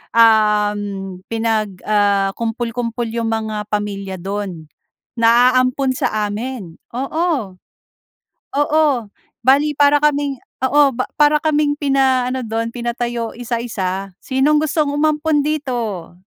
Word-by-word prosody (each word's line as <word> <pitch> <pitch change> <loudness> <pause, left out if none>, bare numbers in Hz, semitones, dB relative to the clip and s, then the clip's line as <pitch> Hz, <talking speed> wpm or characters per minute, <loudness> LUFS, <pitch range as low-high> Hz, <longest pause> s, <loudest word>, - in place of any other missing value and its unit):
um, 210 -4 +2
pinag 220 -3 -1
ah, 200 -2 +2
kumpul-kumpol 230 0 -3
yung 230 0 -2
mga 215 -1 -3
pamilya 200 -2 -3
dun, 190 -4 -5 0.5
na 235 +2 +5
aampon 255 +1 +2
sa 215 -3 0
amin, 210 -4 -5 0.2
oo. 275 - -1 1.0
Oo, 305 +2 +3 0.6
bale 280 +4 +4
para 290 0 +4
kaming 290 -2 +1 0.3
oo, 285 -1 +4
ba 255 - 0 0.2
para 295 0 +5
kaming 300 -2 +1
pina-ano 260 -2 +1
do'n, 230 +1 -3
pinatayo 240 -1 -3
isa-isa. 205 -6 -3
Sinong 280 +3 +2
gustong 305 -1 0
umampon 300 0 +1
dito? 245 - -3
235 Hz, 105 wpm, -18 LUFS, 210-280 Hz, 1.0 s, na